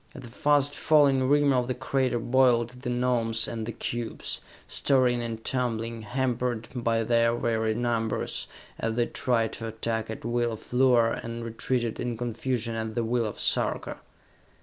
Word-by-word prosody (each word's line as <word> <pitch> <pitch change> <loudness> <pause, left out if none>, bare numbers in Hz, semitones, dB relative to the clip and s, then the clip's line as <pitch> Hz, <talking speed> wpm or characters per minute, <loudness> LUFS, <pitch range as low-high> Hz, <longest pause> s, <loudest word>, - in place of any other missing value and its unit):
At 135 - -9
the 120 - -9
fast 145 +3 +2
falling 140 -5 +4
rim 145 -1 +4
of 125 -1 +1
the 130 - -1
crater 130 0 0
boiled 120 -1 +3
the 125 0 -6
Gnomes 120 -2 +1
and 110 -2 -4
the - - -2
cubes, 120 0 -4 0.3
stirring 125 -3 +3
and 115 -1 -5
tumbling, 115 -3 -2
hampered 120 0 -1
by 115 -2 0
their 115 +1 +3
very 110 -2 0
numbers, 115 -2 -1 0.3
as 115 0 -1
they 120 0 +2
tried 115 -2 0
to 115 - -4
attack 110 0 -3
at 110 - -6
will 120 0 0
of 110 - -10
Luar 125 -3 +4
and 115 0 -5
retreated 115 0 -2
in 120 -2 -2
confusion 120 0 -2
at 110 -1 -4
the 120 - 0
will 115 0 0
of 105 - -7
Sarka. - - 0
120 Hz, 165 wpm, -27 LUFS, 115-125 Hz, 0.3 s, falling